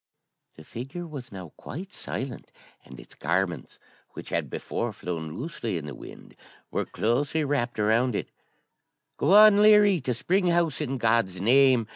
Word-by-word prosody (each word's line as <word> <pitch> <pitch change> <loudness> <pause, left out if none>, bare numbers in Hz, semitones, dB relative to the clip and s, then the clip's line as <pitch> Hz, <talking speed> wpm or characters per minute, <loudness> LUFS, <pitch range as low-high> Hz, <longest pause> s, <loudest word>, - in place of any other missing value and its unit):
The 80 - -13
figure 135 - -7
was 145 -6 -9
now 95 -4 -8
quite 185 +8 -8
silent, 130 -1 -6 0.3
and 65 -1 -12
its - - -14
garments, 85 +2 -2 0.4
which - - -9
had - - -2
before - - -3
flown 80 -3 -6
loosely 125 - -4
in 75 - -6
the 75 - -7
wind, - - -12 0.4
were - - -1
closely 140 +7 0
wrapped 135 -4 -1
around 110 +3 +2
it - - -4 0.9
'Go 170 +8 +3
on, 210 -1 +8
Leary, 210 -4 +6
to 125 -2 -2
Spring 185 - 0
House, 170 -4 +1
in 135 -2 -2
God's 115 -5 +1
name!' 125 +2 +4
125 Hz, 155 wpm, -26 LUFS, 105-160 Hz, 0.9 s, on